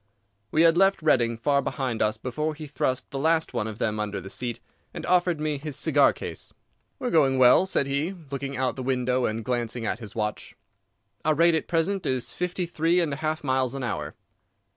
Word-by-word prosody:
We 155 +6 +3
had 165 0 +5
left 195 -2 +3
Reading 120 -6 +3
far 140 +4 +2
behind 130 -5 -3
us 110 0 +1
before 150 +7 -3
he 155 +1 -8
thrust 135 -3 -2
the 135 - -3
last 160 +2 +1
one 105 - -1
of 110 -1 -6
them 110 -1 -1
under 105 -1 -2
the 95 +1 -9
seat, 120 -1 -4 0.4
and - - -5
offered 175 -2 +2
me 150 -2 -1
his 150 -1 -4
cigar 145 -2 +4
case. - - -7 0.5
"We 255 - -4
are - - -1
going 135 -5 +4
well," 130 +9 +6
said 165 - +1
he, 140 +7 -1 0.2
looking 140 -1 -4
out 130 -1 0
the 130 - -5
window 125 -1 0
and 110 0 -4
glancing 120 -1 -2
at - - -2
his 110 -4 -10
watch. 105 -1 -3 0.7
"Our 155 0 +2
rate 170 +2 +4
at 160 - 0
present 180 +4 0
is 130 -2 -1
fifty 180 0 -2
three 170 +1 +1
and 165 -5 0
a - - -4
half 155 0 -2
miles 130 -1 0
an 135 - -4
hour." 75 -11 -4
140 Hz, 210 wpm, -26 LUFS, 120-160 Hz, 0.7 s, well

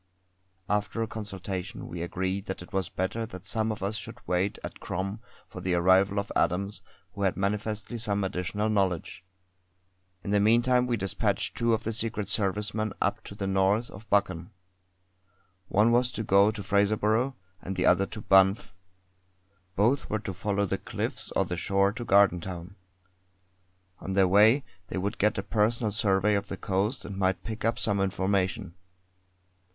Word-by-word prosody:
After 105 +2 0
a - - -3
consultation 100 -3 -5
we 85 - -6
agreed 95 +3 -2
that 95 -2 -5
it 90 - -16
was 95 -3 -1
better 110 +5 -2
that 95 -2 -10
some 110 +3 0
of 105 -2 -5
us 100 +2 -1
should 100 - -6
wait 90 +3 0
at - - -7
Crom 95 +4 -4 0.3
for 90 - -9
the 90 -1 0
arrival 95 +3 +4
of 100 - -4
Adams, 100 +4 0 0.3
who 100 - -7
had 95 -2 +1
manifestly 105 +3 -2
some 100 -2 0
additional 95 +3 -2
knowledge. 95 -5 -1 1.0
In 100 - -3
the 105 - +4
meantime 120 +4 +4
we 120 -1 0
despatched 95 -2 -1
two 115 -1 +2
of 110 - -6
the 115 - -2
Secret 110 -3 -2
Service 105 0 0
men 110 -1 -2
up - - 0
to 100 - -9
the 100 - -4
north 95 +4 +1
of 100 +2 -12
Buchan. 100 -4 +1 1.2
One 105 +5 +3
was 125 +1 +3
to 110 - -3
go 100 0 +5
to 110 -2 -5
Fraserburgh, 110 +6 +2 0.3
and 95 - -5
the 90 - 0
other 95 +2 +4
to 110 - -7
Banff. 95 +1 +4 1.0
Both 120 +8 +2
were 110 - 0
to 100 -2 -5
follow 100 +2 -1
the 95 - -2
cliffs - - -3
or - - +3
the 90 - -4
shore 100 +2 +2
to 120 - -5
Gardentown. 95 -3 +2 1.2
On 95 - -5
their 95 -1 +4
way 110 +8 +5 0.2
they - - -5
would 100 +3 -2
get 105 +1 +2
a 100 - -2
personal 110 +1 +1
survey 100 -1 +2
of 100 -1 0
the 100 - -5
coast 105 +6 -1
and 100 - -6
might 95 -1 0
pick 110 0 -6
up 115 +1 +1
some 100 -2 0
information. 95 0 0
100 Hz, 170 wpm, -28 LUFS, 95-110 Hz, 1.2 s, go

